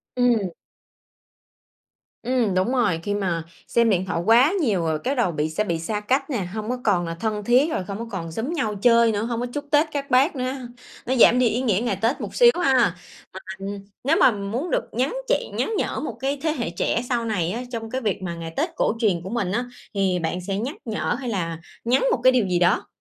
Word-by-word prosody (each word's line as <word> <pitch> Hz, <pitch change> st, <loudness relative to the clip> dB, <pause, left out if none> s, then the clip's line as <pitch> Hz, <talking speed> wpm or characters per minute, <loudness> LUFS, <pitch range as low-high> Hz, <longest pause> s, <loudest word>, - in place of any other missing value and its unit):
Ừm. 245 Hz, -2 st, +3 dB, 1.8 s
Ừm, 240 Hz, -5 st, +1 dB
đúng 185 Hz, +7 st, +1 dB
rồi. 215 Hz, -11 st, +1 dB
Khi 205 Hz, -, -1 dB
mà 180 Hz, -5 st, -1 dB, 0.2 s
xem 235 Hz, -1 st, +3 dB
điện 190 Hz, -2 st, +1 dB
thoại 185 Hz, -3 st, -2 dB
quá 245 Hz, -, +5 dB
nhiều 205 Hz, -, +1 dB
rồi 160 Hz, -2 st, -1 dB
cái 270 Hz, +3 st, 0 dB
đầu 235 Hz, -9 st, +1 dB
bị 150 Hz, 0 st, -1 dB
sẽ 160 Hz, +7 st, -1 dB
bị 170 Hz, -6 st, -2 dB
xa 210 Hz, +6 st, -2 dB
cách 265 Hz, +7 st, 0 dB
nè, 220 Hz, -9 st, -1 dB
hông 215 Hz, +1 st, -4 dB
có 250 Hz, -, -1 dB
còn 180 Hz, -5 st, +2 dB
là 165 Hz, -, -4 dB
thân 210 Hz, +3 st, -2 dB
thiết, 255 Hz, +8 st, +3 dB
rồi 185 Hz, -, -1 dB
không 200 Hz, +2 st, -5 dB
có 230 Hz, -, -4 dB
còn 165 Hz, -4 st, -5 dB
xúm 240 Hz, -, -3 dB
nhau 220 Hz, -10 st, -1 dB
chơi 235 Hz, -1 st, +5 dB
nữa, 210 Hz, +1 st, -1 dB
hông 235 Hz, 0 st, -2 dB
có 245 Hz, -, -1 dB
chúc 290 Hz, -, -4 dB
Tết 300 Hz, +2 st, +4 dB
các 280 Hz, -1 st, -4 dB
bác 275 Hz, +6 st, +4 dB
nữa, 255 Hz, 0 st, -2 dB, 0.5 s
nó 260 Hz, -, 0 dB
giảm 245 Hz, 0 st, +6 dB
đi 250 Hz, -, +4 dB
ý 240 Hz, +4 st, -1 dB
nghĩa 215 Hz, -6 st, +2 dB
ngày 210 Hz, -5 st, 0 dB
Tết 230 Hz, +5 st, +1 dB
một -, -, -6 dB
xíu 485 Hz, -1 st, +7 dB
ha. 270 Hz, -, +3 dB
À, 230 Hz, -9 st, +3 dB, 0.6 s
ừm, 195 Hz, +1 st, -5 dB, 0.4 s
nếu 310 Hz, +4 st, +3 dB
mà -, -, +7 dB
muốn 220 Hz, -, -3 dB
được -, -, +1 dB
nhắn 255 Hz, -, 0 dB
chị -, -, 0 dB
nhắn 450 Hz, -, -1 dB
nhở -, -, -1 dB
một 240 Hz, -7 st, -5 dB
cái 275 Hz, +2 st, -1 dB
thế 315 Hz, -, +1 dB
hệ 240 Hz, -, -3 dB
trẻ 200 Hz, +6 st, -1 dB
sau 240 Hz, -2 st, 0 dB
này 180 Hz, -7 st, -1 dB
á 240 Hz, +4 st, -4 dB
trong 225 Hz, -1 st, -5 dB
cái 260 Hz, +2 st, -2 dB
việc 205 Hz, -5 st, -2 dB
mà 170 Hz, -2 st, -3 dB
ngày 165 Hz, -1 st, -7 dB
Tết 330 Hz, +3 st, 0 dB
cổ -, -, +1 dB
truyền 190 Hz, -7 st, +1 dB
của 190 Hz, -, -7 dB
mình 210 Hz, -6 st, -1 dB
á 240 Hz, +4 st, 0 dB, 0.3 s
thì 190 Hz, -2 st, +1 dB
bạn 170 Hz, +2 st, -2 dB
sẽ 195 Hz, +2 st, -3 dB
nhắc 255 Hz, +8 st, -3 dB
nhở 225 Hz, +1 st, -1 dB
hay 250 Hz, -, -5 dB
là 165 Hz, -6 st, -2 dB, 0.3 s
nhắn 255 Hz, +3 st, +2 dB
một 235 Hz, -, +1 dB
cái 255 Hz, 0 st, +6 dB
điều 240 Hz, -6 st, +2 dB
gì 180 Hz, -1 st, +1 dB
đó? 175 Hz, +3 st, +2 dB
225 Hz, 245 wpm, -23 LUFS, 190-255 Hz, 1.8 s, xíu